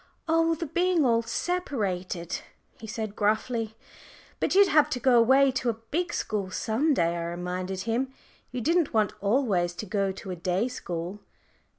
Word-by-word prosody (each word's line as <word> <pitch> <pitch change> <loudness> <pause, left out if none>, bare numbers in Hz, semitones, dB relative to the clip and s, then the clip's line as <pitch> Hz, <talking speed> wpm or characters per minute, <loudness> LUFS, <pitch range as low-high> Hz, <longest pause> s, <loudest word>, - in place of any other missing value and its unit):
"Oh, 330 0 +3
the 330 - -4
being 345 0 +2
all 230 -2 +3
separated," 200 - -2 0.4
he 220 - -8
said 215 -2 -4
gruffly. 220 +1 0 0.6
"But - - 0
you'd 400 +1 +8
have 305 -3 +5
had 300 - -16
to 250 - -2
go 245 0 +5
away 265 +4 +5
to 250 -1 -1
a - - +1
big 300 +11 -3
school 205 -3 -2
some 245 +10 +1
day," 170 -3 +1
I 170 -1 -3
reminded 180 +2 -4
him. 235 +5 -1 0.4
"You 250 0 -3
didn't 330 0 +1
want 215 -2 +2
always 200 -6 +1
to 215 - -5
go 195 0 0
to 190 0 -8
a - - -3
day 180 +6 0
school." 175 -4 -5
225 Hz, 175 wpm, -27 LUFS, 190-275 Hz, 0.6 s, you'd